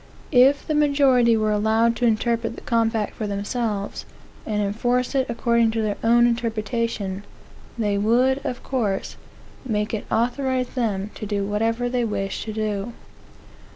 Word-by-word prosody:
If 270 +3 +5
the 310 - -1
majority 275 -6 +4
were 215 -1 +1
allowed 220 +2 +2
to 245 - +2
interpret 230 +1 0
the - - -10
compact 225 -2 0
for 215 - -4
themselves, 205 0 -3 0.4
and 210 -2 -1
enforce 245 +6 0
it 265 -2 +1
according 235 0 +2
to 220 - +1
their 210 -1 -1
own 235 +1 +5
interpretation, 230 -4 -2 0.5
they 205 -3 0
would, 250 +6 +3
of 250 - -4
course, 215 -8 -2 0.5
make 215 -4 -2
it 220 - -3
authorize 255 +2 0
them 210 -5 -2
to 215 - -7
do 200 -1 -1
whatever 225 +4 0
they 245 0 0
wish 195 -3 -3
to 220 - -4
do. 215 +1 -3
230 Hz, 150 wpm, -23 LUFS, 210-245 Hz, 0.5 s, If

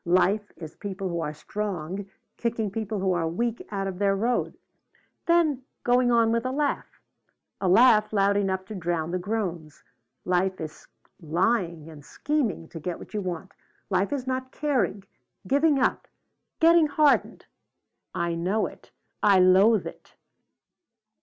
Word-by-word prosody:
Life 190 +4 +2
is 160 -2 -9
people 195 -2 -5
who 170 -1 -2
are 150 - -2
strong 190 +2 -5 0.3
kicking 225 -3 -2
people 215 0 -3
who 190 -1 +1
are 170 -2 0
weak 230 +8 -2
out 195 -2 -3
of 190 -1 -5
their 200 -1 +2
road 235 +5 -1 0.7
then 330 -6 +3 0.2
going 245 0 +3
on 230 -1 +4
with 230 0 +1
a 255 - -1
laugh 285 +1 -2 0.6
a 190 - +1
laugh 215 +1 +5
loud 200 -1 +2
enough 190 -2 0
to 215 - -8
drown 170 -3 -2
the 185 - -1
groans. 175 -6 -4 0.4
Life 185 +1 +1
is 155 -1 -8 0.3
lying 170 -1 0
and 155 -3 -12
scheming 255 - -2
to 165 - -8
get 175 +2 -4
what - - -13
you 210 - -1
want. 185 +1 -5 0.4
Life 195 +4 +1
is 275 -3 -2
not 260 0 -3
caring 235 - -1 0.4
giving 285 +3 +3
up 260 - 0 0.5
getting 330 -1 +6
hardened 295 0 +2 0.7
I 170 -1 -1
know 180 +6 0
it. - - -10 0.3
I 200 -2 +5
loathe 190 +4 +5
it." - - -11
200 Hz, 150 wpm, -26 LUFS, 180-235 Hz, 0.7 s, getting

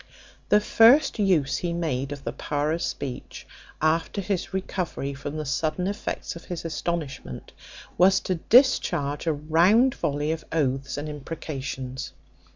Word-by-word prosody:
The 210 - +6
first 230 +5 +5
use 175 -9 +2
he 175 -1 -2
made 150 -5 -2
of 140 -1 -7
the - - -4
power 145 +1 -1
of 165 +1 -1
speech, 135 -6 -5 0.4
after 165 +5 +1
his 195 -2 -2
recovery 185 -7 -3
from 140 +2 -6
the 155 - -3
sudden 155 +5 -1
effects 200 -2 -4
of 170 - -10
his 175 -2 -6
astonishment, 155 - -4 0.5
was 190 +2 +6
to 185 -3 -2
discharge 170 - +3
a 160 - +3
round 175 - +4
volley 150 -1 -1
of 160 -1 -3
oaths 135 -3 -1
and 145 +1 -4
imprecations. 140 -3 -6
160 Hz, 145 wpm, -25 LUFS, 140-180 Hz, 0.5 s, The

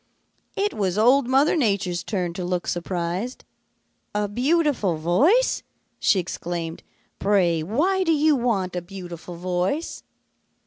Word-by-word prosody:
"It 410 +1 0
was 190 -2 -1
Old 250 +4 +4
Mother 270 +6 +3
Nature's 200 - 0
turn 180 -5 -2
to 180 - -5
look 180 0 -2
surprised. 175 +6 -3 0.7
'A 210 -1 0
beautiful 255 - +1
voice!' 275 - +3 0.4
she 200 - +3
exclaimed. 170 -1 -4 0.4
'Pray, 185 -5 +2
why 320 - +1
do 330 - +2
you 305 -1 +4
want 205 -8 -1
a 180 - -2
beautiful 175 -2 -9
voice?' 180 - -2
195 Hz, 125 wpm, -24 LUFS, 175-270 Hz, 0.7 s, Old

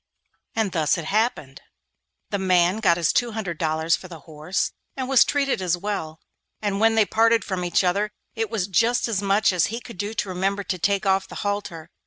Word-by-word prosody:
And 220 -4 0
thus 155 -4 +1
it 165 - -5
happened. 200 - -1 0.7
The 200 - -1
man 185 +1 +3
got 170 -6 +3
his 170 -3 +1
two 240 -2 +1
hundred 195 -7 -4
dollars 160 +1 +1
for 185 - -10
the 165 -4 -11
horse, 155 +5 -3 0.3
and 260 -1 -2
was 265 -2 +6
treated 275 -7 0
as 180 -1 +1
well, 175 -5 -4 0.4
and 200 -2 -2
when 225 +1 +4
they 220 -1 +4
parted 230 +1 +3
from 190 -3 -3
each 175 +2 +1
other 200 +4 +1 0.2
it 225 -2 -2
was 215 -5 -1
just 225 +7 +2
as 210 -4 -1
much 200 0 +2
as 170 -5 +2
he 230 +2 -4
could 235 -6 -12
do 205 +2 -3
to 200 - -2
remember 195 +2 -1
to 185 -2 -3
take 200 +3 +1
off 195 0 +2
the - - -10
halter. 180 -5 -4
195 Hz, 210 wpm, -23 LUFS, 175-220 Hz, 0.7 s, was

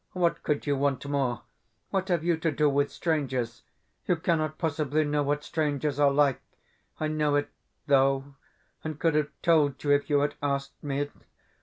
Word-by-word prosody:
What 175 -2 +1
could 150 -1 -1
you 145 -1 +1
want 140 0 0
more? 135 -4 -1 0.5
What 190 -1 0
have 175 -4 +1
you 170 0 +2
to 160 0 -1
do 150 +1 +2
with 145 0 +1
strangers? 130 -8 -2 0.5
You 180 - +3
cannot 155 -2 0
possibly 155 -1 0
know 150 0 0
what 145 +1 0
strangers 150 -2 -1
are 145 -1 +6
like. 140 -1 +2 0.6
I 155 - 0
know 150 -1 +1
it, 145 0 0 0.3
though, 135 -1 +2 0.5
and 155 -2 -4
could 165 -2 +2
have 150 -1 +1
told 155 -5 +3
you 145 - +2
if 145 +1 +2
you 145 -1 +3
had 145 - 0
asked 140 -1 -2
me. 145 0 -1
145 Hz, 175 wpm, -28 LUFS, 140-155 Hz, 0.6 s, are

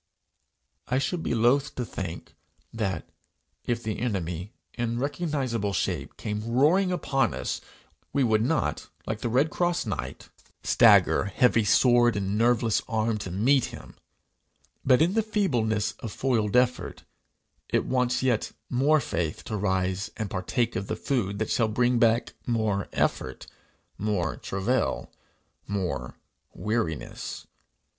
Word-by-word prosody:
I 125 - +1
should 165 +5 -1
be 120 - -1
loth 125 +6 +2
to 125 - -2
think 90 -5 -6 0.4
that, 95 -7 -2 0.6
if 120 0 -1
the 110 -1 -3
enemy, 95 -5 -3 0.2
in 120 -1 -2
recognizable 135 - -1
shape, - - -2
came 105 +1 -4
roaring 160 +10 +3
upon 140 -6 0
us, - - -3 0.5
we 140 - +2
would 110 -3 +3
not, 145 +8 -1 0.2
like 110 -1 -3
the 120 - -1
red 135 +7 +2
cross 175 -3 0
knight, 105 - -5 0.3
stagger, - - +5
heavy 115 +3 +3
sword 120 +2 +4
in 100 0 -1
nerveless 115 -1 +2
arm, 110 0 0
to 95 - -5
meet 120 +9 +3
him; - - -10 0.9
but, 130 +3 +5
in 175 +3 +1
the 225 - +3
feebleness 125 - 0
of 115 - -6
foiled 110 -6 0
effort, 125 0 +1 0.7
it - - +1
wants 125 -1 +1
yet 125 -4 +1 0.2
more 140 +5 +4
faith 85 - -3
to 110 - -4
rise 95 -1 0
and 110 -3 -4
partake 115 +5 -1
of 100 +1 -3
the 110 - -2
food 105 -5 -1
that 110 +1 -2
shall 115 - +2
bring 120 +2 +2
back 115 0 +2
more 110 -4 0
effort, - - -1 0.5
more 100 -6 -1
travail, 105 +7 -1 0.6
more 85 -11 -3 0.4
weariness. 105 -8 -3
115 Hz, 135 wpm, -27 LUFS, 100-130 Hz, 0.9 s, stagger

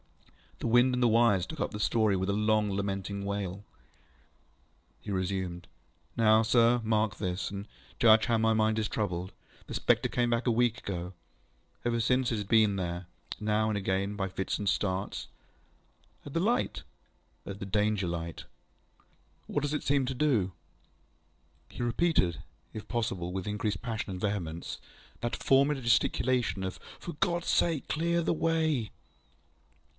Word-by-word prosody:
The - - -6
wind 120 +2 +5
and 125 - -1
the 120 - +5
wires 110 -5 +4
took 160 - -8
up - - -1
the 105 - -6
story 110 -1 +2
with 95 +1 -1
a - - +2
long 105 0 +2
lamenting 100 0 -3
wail. 100 -1 -3 1.4
He - - -7
resumed. 95 -2 -2 0.5
ŌĆ£Now, 110 0 +5
sir, 120 +1 +4
mark 110 -1 +1
this, 90 -1 -2
and 100 +1 -6 0.3
judge 110 -1 +6
how 115 -1 +2
my 110 0 +3
mind 110 0 +2
is 110 -1 0
troubled. 95 -4 -2 0.3
The - - -8
spectre - - +2
came 120 -1 +1
back 120 +1 0
a 120 - +3
week 120 +1 +2
ago. 90 -4 -5 0.7
Ever 120 -1 0
since, 125 +2 +2
it - - +1
has 105 - -2
been 105 0 +4
there, 90 -1 -3 0.3
now 110 0 +1
and 105 - 0
again, 100 +1 -1
by 95 -2 -1
fits 95 +1 -3
and 100 -2 0
starts. 95 0 -1 1.0
ŌĆØ - - -6
ŌĆ£At - - -11
the 165 - +1
light? 225 +7 0 0.6
ŌĆØ - - -5
ŌĆ£At - - -14
the 100 - -5
Danger 105 -1 +1
light. 85 -1 -4 1.1
ŌĆØ - - -8
ŌĆ£What 145 - +2
does 145 +1 -1
it 150 - -2
seem 140 -1 +2
to 135 - -2
do? 125 -9 +2
ŌĆØ 95 - -13 1.2
He - - -4
repeated, 120 - +1 0.3
if 110 - -7
possible 95 -7 -2
with 95 +1 -4
increased 105 0 -2
passion 110 -4 -3
and 90 -1 -6
vehemence, 85 -5 -3 0.4
that 120 - -1
former 140 +2 +3
gesticulation 120 -4 +1
of, 95 -1 -4 0.2
ŌĆ£For 170 -4 -7
GodŌĆÖs 175 -1 0
sake, 165 -5 +1
clear 170 +2 +1
the 170 - +1
way! 160 - 0
110 Hz, 165 wpm, -30 LUFS, 95-120 Hz, 1.4 s, judge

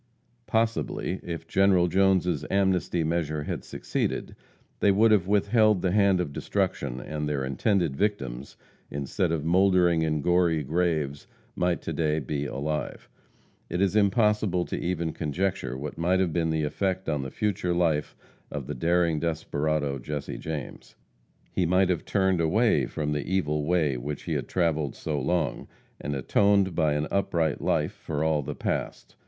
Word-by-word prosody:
Possibly, 110 -4 -1
if 85 -1 -6
General 95 -1 +4
Jone's 90 -3 +2
amnesty 95 -3 +1
measure 80 -2 -1
had - - -4
succeeded, - - -3 0.4
they 100 - +4
would 110 +3 +4
have 95 -4 +3
withheld 105 0 +3
the 90 - +2
hand 100 -2 +4
of 75 -5 -2
destruction, 95 -12 -2
and 75 +3 -4
their 70 -3 -1
intended 85 - 0
victims, 70 - -2 0.3
instead 70 +6 -1
of 80 -2 -1
mouldering 90 -1 +4
in 75 -2 0
gory 85 -3 +2
graves, 75 -2 -1 0.3
might 90 -1 0
to - - -3
day 75 -2 0
be 70 0 -2
alive. 75 +4 -4 0.6
It 90 - -2
is 100 +1 +2
impossible 105 -3 +2
to - - -4
even 85 -2 -2
conjecture 75 -5 -2
what 75 +4 -6
might 90 +3 +2
have 90 -4 +1
been 85 -2 +1
the 80 -1 0
effect 95 +5 -1
on 75 -3 0
the 65 - -5
future 100 - -1
life 80 -4 0 0.4
of 70 -3 -4
the - - -4
daring 85 +3 +1
desperado, 75 -3 -1
Jesse 75 +4 -5
James. 75 -3 -6 0.6
He 90 - +1
might 90 +1 +3
have 85 -3 -1
turned 95 -3 +1
away 85 - +2
from 75 -1 -3
the 75 -1 -1
evil 75 -6 0
way 80 -6 +1
which 70 +4 -5
he - - -3
had - - -2
travelled 80 -6 0
so 75 -3 -3
long, 80 -1 -1 0.3
and 75 - -3
atoned 100 +7 +3
by 80 -3 +2
an 75 +1 0
upright 85 -6 0
life - - 0
for 75 0 -3
all 80 -2 +2
the 65 - -5
past. - - -4
85 Hz, 160 wpm, -27 LUFS, 75-95 Hz, 0.6 s, General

